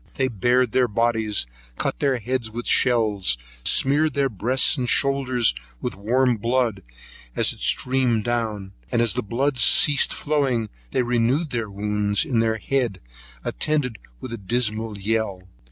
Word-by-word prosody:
They 130 Hz, -1 st, 0 dB
bared 120 Hz, +2 st, +1 dB
their 125 Hz, +1 st, +2 dB
bodies, 110 Hz, -, 0 dB, 0.3 s
cut -, -, -2 dB
their 135 Hz, -3 st, +1 dB
heads 120 Hz, 0 st, -3 dB
with 120 Hz, +2 st, -6 dB
shells, 105 Hz, -, +2 dB, 0.2 s
and -, -, -5 dB
smeared 150 Hz, +3 st, +3 dB
their 140 Hz, -1 st, +1 dB
breasts 125 Hz, -, +2 dB
and 125 Hz, -4 st, -2 dB
shoulders 130 Hz, -, +2 dB, 0.3 s
with -, -, -3 dB
the 95 Hz, -, -15 dB
warm 125 Hz, +3 st, +2 dB
blood, 115 Hz, -2 st, 0 dB, 0.5 s
as -, -, +2 dB
it -, -, -14 dB
streamed 125 Hz, -4 st, +1 dB
down; 110 Hz, -5 st, -2 dB, 0.2 s
and -, -, +1 dB
as 115 Hz, -4 st, +2 dB
the -, -, -1 dB
blood 130 Hz, +5 st, -1 dB
ceased 145 Hz, +4 st, +5 dB
flowing, 135 Hz, -7 st, -1 dB, 0.2 s
they 125 Hz, -, 0 dB
renewed 125 Hz, +6 st, 0 dB
the 115 Hz, -3 st, -2 dB
wounds 105 Hz, 0 st, 0 dB
in 120 Hz, -4 st, 0 dB
their 110 Hz, -1 st, +1 dB
head, 125 Hz, -4 st, -1 dB, 0.4 s
attended 145 Hz, -7 st, -1 dB, 0.2 s
with 130 Hz, -, -7 dB
a 115 Hz, -, -6 dB
dismal 110 Hz, 0 st, -1 dB
yell. 100 Hz, -2 st, -2 dB
120 Hz, 155 wpm, -23 LUFS, 110-130 Hz, 0.5 s, ceased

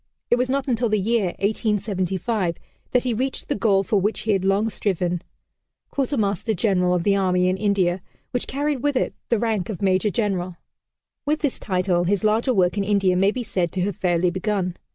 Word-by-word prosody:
It 240 Hz, -, +5 dB
was 250 Hz, +1 st, 0 dB
not 275 Hz, +1 st, 0 dB
until 235 Hz, -2 st, +1 dB
the 215 Hz, -, +2 dB
year 225 Hz, +1 st, +1 dB
1875, 200 Hz, -2 st, -1 dB, 0.3 s
that 250 Hz, -, +2 dB
he 250 Hz, -2 st, 0 dB
reached 260 Hz, +4 st, -3 dB
the -, -, +1 dB
goal 195 Hz, -2 st, +2 dB
for 200 Hz, 0 st, +1 dB
which 210 Hz, +3 st, 0 dB
he 220 Hz, -, 0 dB
had 195 Hz, -2 st, +1 dB
long 195 Hz, +3 st, +2 dB
striven 180 Hz, -5 st, -1 dB, 0.7 s
Quartermaster 220 Hz, -, 0 dB
General 180 Hz, -2 st, +2 dB
of 175 Hz, -, 0 dB
the 200 Hz, +1 st, +3 dB
Army 180 Hz, -2 st, +2 dB
in 185 Hz, -, +2 dB
India, 190 Hz, -3 st, +1 dB, 0.3 s
which 245 Hz, -, -2 dB
carried 285 Hz, -1 st, -1 dB
with 290 Hz, 0 st, 0 dB
it -, -, 0 dB, 0.2 s
the 235 Hz, -, +3 dB
rank 215 Hz, -4 st, -1 dB
of 205 Hz, -, -4 dB
Major 190 Hz, +1 st, +2 dB
General. 190 Hz, -5 st, -2 dB, 0.7 s
With 300 Hz, +1 st, 0 dB
this 290 Hz, -5 st, -1 dB
title 180 Hz, -3 st, 0 dB
his 200 Hz, +2 st, +1 dB
larger 220 Hz, +4 st, +2 dB
work 185 Hz, -4 st, +2 dB
in -, -, +1 dB
India 195 Hz, -2 st, +2 dB
may 195 Hz, +2 st, +4 dB
be 245 Hz, +3 st, -3 dB
said 175 Hz, -6 st, -1 dB
to 185 Hz, -, -1 dB
have 200 Hz, -1 st, -1 dB
fairly 175 Hz, -1 st, +1 dB
begun. 185 Hz, -1 st, -1 dB
200 Hz, 195 wpm, -23 LUFS, 185-225 Hz, 0.7 s, It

